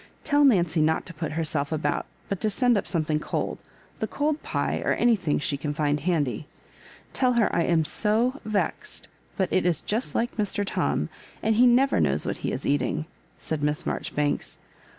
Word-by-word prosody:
*' - - -34
Tell 290 -1 +3
Nancy 175 - +4
not 160 +1 +1
to 170 - -4
put 160 -1 -4
herself 155 -2 -1
about, 150 -2 -1 0.2
but 200 - -3
to 215 - +2
send 245 +2 +3
up 200 - -1
something 155 -3 0
cold - - -3 0.2
— - - -29
^the - - -1
cold 300 +1 -1
pie, - - -1
or - - +2
anything 210 -11 +2
she 145 -1 -1
can 145 +1 -3
find 150 -1 +1
handy. 145 -6 -1 0.7
Tell 255 -1 +2
her 235 -2 +2
I 170 - +2
am 165 -2 +2
so 230 - +1
vexed, 215 -2 -3 0.3
but 190 - 0
it 185 - +3
is 175 -2 +2
just 225 +5 -2
like 240 +1 -1
Mr. 205 -1 -1
Tom; - - -1 0.3
and 220 - +3
he 245 +3 +6
never 260 +3 +4
knows - - +1
wha - - 0
he - - -4
is - - -4
eating," 145 +2 0 0.3
said 160 -2 -3
Miss 150 0 -1
Marjoribanks. 145 -1 -2
175 Hz, 190 wpm, -26 LUFS, 150-230 Hz, 0.7 s, he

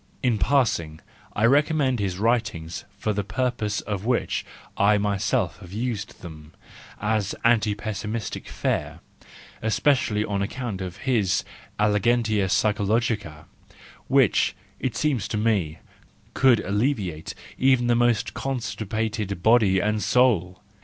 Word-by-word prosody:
(In 120 -4 +2
passing 85 - +1 0.4
I 110 - +2
recommend 140 -1 +3
his 95 -3 -2
writings 105 -7 -1
for 105 +2 -1
the 105 0 -1
purpose 110 0 -2
for 105 -2 -1
which 120 +5 -1 0.3
I 105 +1 +4
myself 100 -1 0
have 85 - -12
used 110 -2 -4
them, 80 -2 -11 0.5
as 105 -2 -1
anti 110 -3 +3
pessimistic 105 +1 -4
fare, - - -2 0.6
especially 110 -2 +1
on 100 -2 -2
account 105 -1 -4
of 90 -1 -6
his 110 -9 +2 0.4
elegantia 105 -1 +2
psychological 105 -4 0 0.6
which, - - +3 0.2
it 130 - -2
seems 135 -10 0
to 105 - -3
me, 100 -8 0 0.6
could 130 -5 +4
alleviate 100 - -2 0.2
even 130 -2 +4
the 120 - +3
most 120 -2 +2
constipated 110 -5 -3
body 110 -5 +5
and 105 +2 0
soul). 100 -9 +2
105 Hz, 120 wpm, -24 LUFS, 100-120 Hz, 0.6 s, body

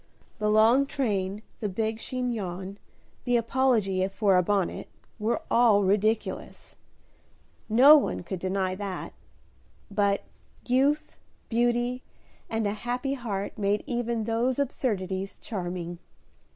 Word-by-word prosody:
The 210 0 +1
long 225 +6 +5
train, 205 -7 -2 0.2
the 210 - -2
big 220 +3 -2
chignon, 205 -7 -4 0.4
the 245 -1 +2
apology 230 -6 +1
for 195 0 +2
a 180 - +5
bonnet, 195 0 -1 0.3
were 220 +3 -1
all 225 -4 +5
ridiculous, 210 +3 -1 0.9
no 260 +7 +8
one 280 - -1
could 185 +1 -5
deny 185 0 -1
that, 190 -1 -5 0.8
but 200 -1 +1 0.4
youth, 275 +4 +1 0.3
beauty, 240 +1 +1 0.5
and 225 -1 -1
a 205 - 0
happy 245 +5 -2
heart 215 -7 -4
made 205 0 +1
even 235 -3 -1
those 235 +3 0
absurdities 195 -8 -2
charming. 175 -4 -5
215 Hz, 110 wpm, -27 LUFS, 195-240 Hz, 0.9 s, no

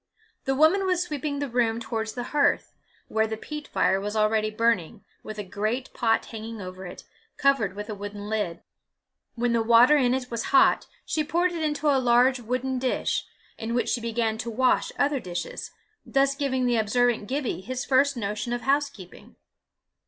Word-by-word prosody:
The 270 - +1
woman 335 +7 +4
was 360 -1 +2
sweeping 295 -3 -3
the 285 0 -2
room 230 -2 +1
towards 225 -1 -3
the 245 - -4
hearth, 290 -1 +2 0.3
where 220 0 +1
the 220 0 -4
peat 300 +5 -7
fire 190 0 +1
was 210 +2 -4
already 215 0 +2
burning, 215 -3 0 0.2
with 215 - -8
a 210 - -3
great 215 +7 -3
pot 225 -2 +1
hanging 225 0 -7
over 185 -1 -7
it, - - -10 0.3
covered 250 -9 +2
with 210 0 -6
a 215 - -4
wooden 205 0 -7
lid. 210 -6 -2 0.7
When 240 0 0
the 230 - +2
water 235 +5 +6
in 255 -2 +3
it 255 -1 -4
was 230 0 -2
hot, 275 - +4 0.2
she 310 - 0
poured 345 +4 +1
it 335 -2 -4
into 300 -1 -1
a 275 -2 +4
large 250 +1 +4
wooden 255 +2 -2
dish, 255 0 -1 0.3
in 230 +1 -3
which 245 - 0
she 240 - 0
began 225 -1 -1
to 235 - -3
wash 255 +3 +2
other 285 -1 +2
dishes, 180 -6 -5 0.3
thus 275 0 +2
giving 270 -3 -1
the 240 -1 +2
observant 225 0 +1
Gibbie 265 -7 -2
his 255 +6 -4
first 275 0 +3
notion 210 +2 -3
of 240 - -2
housekeeping. 270 -8 -2
240 Hz, 180 wpm, -26 LUFS, 220-275 Hz, 0.7 s, water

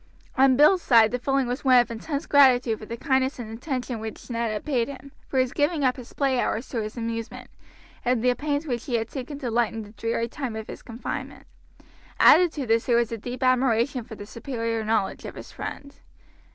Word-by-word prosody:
On 265 -1 +5
Bill's 325 +6 +6
side 225 -6 +5
the 250 - -1
feeling 270 +1 +1
was 245 +3 -3
one 260 -2 +6
of 240 -1 +3
intense 280 +6 -4
gratitude 255 -5 +4
for 215 - -10
the 235 - -5
kindness 265 0 +1
and 230 -3 -7
attention 250 -2 -4
which 220 +3 -8
Ned 230 -1 -1
had 210 - -4
paid 250 -6 0
him, 275 0 -10 0.2
for 265 - -3
his 255 -1 +2
giving 295 0 +1
up 255 -1 +3
his 250 -3 -11
play 270 -3 0
hours 235 0 -1
to 230 - -2
his 215 +2 -6
amusement, 230 -1 -5 0.5
and 245 -2 +1
the 250 0 +4
pains 290 +3 -2
which 245 -4 -3
he 245 - -1
had 225 -1 -1
taken 275 +1 -6
to 255 -5 -4
lighten 225 -1 0
the 205 - -13
dreary 230 +2 -2
time 245 -2 -5
of 220 0 -5
his - - -9
confinement. 230 +1 -6 0.7
Added 350 0 +7
to 285 -3 -4
this 225 0 +1
there 240 -2 +4
was 235 -1 +1
a 230 - -3
deep 245 +4 -5
admiration 255 0 +2
for 220 - -10
the 205 - -9
superior 230 -1 -3
knowledge 215 -2 -1
of - - -8
his - - -10
friend. 280 0 -7
245 Hz, 220 wpm, -25 LUFS, 230-270 Hz, 0.7 s, Added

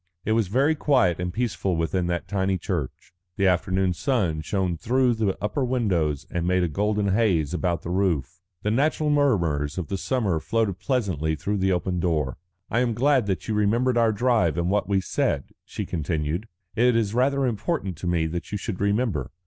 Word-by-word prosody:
It 110 - 0
was 110 -2 +2
very 135 - +2
quiet 130 - +2
and 90 0 -2
peaceful 100 -4 -1
within 85 +2 0
that 85 0 -2
tiny 95 -1 0
church. 85 -5 -4 0.2
The 100 - +2
afternoon 95 0 +2
sun 90 - 0
shone 95 +1 -1
through 125 +7 +2
the 110 -4 -1
upper 130 +7 -1
windows 95 - 0
and 85 0 -1
made 90 0 +2
a - - +2
golden 105 +5 0
haze 95 -7 +2
about 85 -1 -1
the 85 - -4
roof. 90 -3 -1 0.2
The 105 - 0
natural 150 +5 +1
murmurs 85 - +1
of 90 - -4
the 95 -1 -2
summer 105 -11 0
floated 105 0 -1
pleasantly 95 - -1
through 100 +7 -2
the 95 0 +1
open 90 0 -1
door. 75 -6 0 0.3
"I 115 - +2
am 120 -2 +1
glad 130 -2 +3
that 95 - -2
you 110 - -1
remembered 115 +5 +2
our 115 -2 +4
drive 105 - +2
and 85 +2 0
what 100 -2 0
we 95 -1 +2
said," 70 -5 -1
she - - -5
continued. 80 +4 -2 0.3
"It 120 +1 +3
is 110 -3 +1
rather 135 +3 +2
important 115 - -2
to 90 - -5
me 85 -2 +1
that 85 +2 -4
you 105 - -1
should 95 -1 -5
remember. 100 - 0
95 Hz, 190 wpm, -25 LUFS, 85-115 Hz, 0.3 s, our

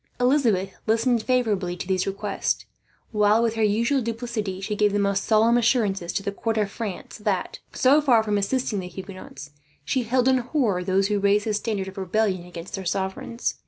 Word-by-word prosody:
Elizabeth 245 -8 +2 0.2
listened 230 +1 +2
favourably 210 -8 0
to 180 - -6
these 190 -1 0
requests 195 +1 -2 0.5
while, 210 +1 +3
with 230 -1 +1
her 225 - -2
usual 230 +6 +2
duplicity, 225 -4 -3
she 200 +2 -3
gave 210 -1 +2
the - - +2
most 200 -1 +1
solemn 225 +2 +4
assurances 210 -7 +1
to 195 - -2
the 200 - -2
court 225 +2 -2
of 205 -2 0
France 215 -1 -6
that, 205 -3 -2
so 280 +4 +4
far 245 -6 +4
from 210 -1 -1
assisting 220 0 -1
the 180 - -5
Huguenots, 180 -6 -9 0.3
she 260 - +1
held 250 +2 +1
in 260 -1 +4
horror 240 - 0
those 195 +2 +1
who 205 -1 +1
raised 200 +1 +2
the 215 - 0
standard 210 -2 -2
of 190 +1 -8
rebellion 190 -1 0
against 175 0 -9
their 195 - -4
sovereigns. 190 +6 -3
210 Hz, 190 wpm, -24 LUFS, 195-235 Hz, 0.5 s, solemn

